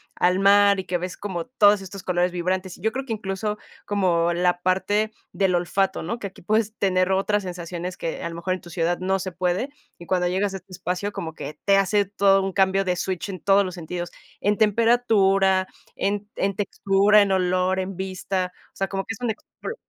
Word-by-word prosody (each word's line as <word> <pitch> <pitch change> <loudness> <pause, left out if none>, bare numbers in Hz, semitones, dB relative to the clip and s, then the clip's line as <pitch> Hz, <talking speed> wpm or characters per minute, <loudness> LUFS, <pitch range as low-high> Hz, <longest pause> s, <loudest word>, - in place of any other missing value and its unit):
al 180 +1 +2
mar 200 0 +5
y - - -12
que 180 -1 -1
ves 180 +1 -5
como 185 -5 -4
todos 210 -5 +4
estos 195 0 -9
colores 180 0 0
vibrantes, 185 +1 -2
y - - -18
yo 220 +3 +1
creo 265 +3 -4
que 235 - -3
incluso 210 0 -3 0.3
como 175 -4 +1
la 180 0 +1
parte 205 +4 +1 0.2
del 190 -2 +1
olfato, 190 +2 0
¿no?, 205 +9 -3
que 200 - -4
aquí 190 - -15
puedes 215 +3 0
tener 185 -1 +2
otras 205 +2 +1
sensaciones 175 0 -5
que 165 - -4
a - - -3
lo 165 - -8
mejor 175 +2 -2
en 185 - -8
tu 175 - -13
ciudad 170 0 0
no 190 +1 0
se 185 0 -4
puede, 180 +8 -1 0.3
y 170 - -11
cuando 180 0 +1
llegas 195 +2 0
a - - -3
este 190 0 -16
espacio 185 +3 -3
como 160 -1 -5
que 150 - -7
te 200 -1 +4
hace 200 +1 +3
todo 195 0 +3
un 195 - -2
cambio 195 0 +2
de 180 -2 -1
switch 190 0 -3
en 185 -2 -5
todos 200 0 +4
los 185 -1 -5
sentidos, 175 0 -5 0.3
en 205 +1 +2
temperatura, 205 -4 +3 0.3
en 205 +1 -2
en 200 +1 0
textura, 205 +1 +3
en 200 - +2
olor, 185 0 +1
en 190 0 -3
vista. 185 0 -3 0.2
O - - -55
sea, 195 - -2
como 195 0 -3
que 225 - -4
es 225 - -13
una 240 - 0
explo 220 - -8
190 Hz, 215 wpm, -24 LUFS, 180-200 Hz, 0.3 s, mar